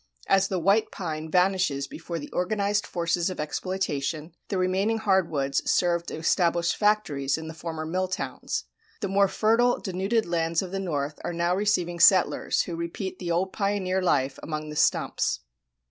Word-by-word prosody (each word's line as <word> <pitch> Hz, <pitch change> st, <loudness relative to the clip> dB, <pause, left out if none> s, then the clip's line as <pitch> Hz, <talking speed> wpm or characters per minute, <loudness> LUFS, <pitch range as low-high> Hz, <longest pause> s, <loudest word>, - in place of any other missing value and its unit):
As 195 Hz, 0 st, +3 dB
the 190 Hz, -, -2 dB
white 200 Hz, +5 st, +3 dB
pine 160 Hz, -3 st, -5 dB
vanishes 180 Hz, -5 st, +2 dB
before 165 Hz, +3 st, -6 dB
the 145 Hz, -2 st, -8 dB
organized 205 Hz, +2 st, 0 dB
forces 170 Hz, 0 st, 0 dB
of 185 Hz, -, -6 dB
exploitation, 155 Hz, -2 st, -2 dB
the 195 Hz, -, -2 dB
remaining 190 Hz, +5 st, +1 dB
hard 190 Hz, -5 st, +2 dB
woods 140 Hz, -2 st, 0 dB
serve 170 Hz, -1 st, +2 dB
to -, -, -4 dB
establish 170 Hz, +1 st, +2 dB
factories 160 Hz, -11 st, +1 dB
in 160 Hz, 0 st, -7 dB
the 160 Hz, -, -6 dB
former 160 Hz, 0 st, -5 dB
mill 185 Hz, +4 st, -1 dB
towns. 185 Hz, -, -3 dB, 0.4 s
The 200 Hz, -, -1 dB
more 195 Hz, +1 st, +3 dB
fertile 230 Hz, +5 st, +2 dB
denuded 195 Hz, +4 st, 0 dB
lands 165 Hz, 0 st, 0 dB
of 180 Hz, -, -7 dB
the 195 Hz, -, -2 dB
north 150 Hz, -5 st, -3 dB
are -, -, -3 dB
now 170 Hz, +1 st, +1 dB
receiving 180 Hz, -4 st, 0 dB
settlers 185 Hz, +1 st, +4 dB
who 170 Hz, -, -5 dB
repeat 170 Hz, +3 st, -5 dB
the 175 Hz, -, -4 dB
old 180 Hz, +3 st, 0 dB
pioneer 195 Hz, -2 st, 0 dB
life 135 Hz, -6 st, +1 dB
among 155 Hz, -1 st, -5 dB
the 150 Hz, -, -7 dB
stumps. 65 Hz, -, +1 dB
180 Hz, 170 wpm, -26 LUFS, 160-195 Hz, 0.4 s, settlers